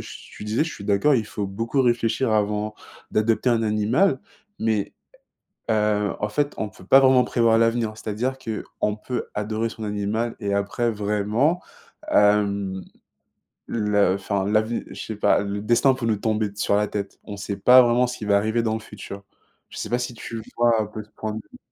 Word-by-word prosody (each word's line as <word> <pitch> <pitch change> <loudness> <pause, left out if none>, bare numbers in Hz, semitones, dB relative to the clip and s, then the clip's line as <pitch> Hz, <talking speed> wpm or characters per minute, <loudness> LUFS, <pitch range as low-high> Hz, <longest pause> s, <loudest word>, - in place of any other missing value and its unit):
tu - - -10
disais, 110 +6 +1
je 160 - -5
suis 100 - -9
d'accord. 105 +9 +3
Il 110 -3 -1
faut 105 -1 -4
beaucoup 115 +7 -1
réfléchir 120 0 +1
avant 105 0 0 0.4
d'adopter 115 +3 +2
un 115 -1 +2
animal, 110 - +2 0.4
mais 110 -3 0 0.8
heu, 105 -1 +1
en 105 - 0
fait, 145 +6 0
on 110 - -2
peut 95 - -16
pas 135 +8 +7
vraiment 130 -1 +5
prévoir 115 -1 +3
l'avenir. 115 -1 +2
C'est-à-dire 115 +5 -2
qu'on 105 -3 -3
peut 120 +2 -4
adorer 110 +2 -2
son 110 - -7
animal 105 +3 -2
et 100 -2 -2
après 100 +4 0
vraiment, 105 - 0 0.5
hem, 100 -2 +2 0.9
le 105 -4 +2
enfin 100 0 -2
l'ave 110 +2 +1 0.2
je - - -8
sais 110 - -5
pas, 105 - +3
le 100 0 -3
destin 120 +5 +3
peut 130 - -4
nous 115 -2 +2
tomber 110 0 -1
sur 100 0 +1
la 105 0 +1
tête. 100 -1 -5
On 105 - -6
sait 100 0 -5
pas 125 +1 +7
vraiment 120 +1 +3
ce 125 +1 -5
qui - - -8
va 100 -1 +4
arriver 110 +3 0
dans 110 -1 0
le - - -3
futur. 100 -2 -10 0.5
Je - - -11
sais - - -4
pas 120 - +1
si 125 0 -4
tu 115 0 -7
vois 120 -1 +3
un - - -1
peu 105 +1 -8
ce 105 - -25
point 110 - -3
de 110 - -5
vue? - - -13
110 Hz, 195 wpm, -23 LUFS, 105-115 Hz, 0.9 s, pas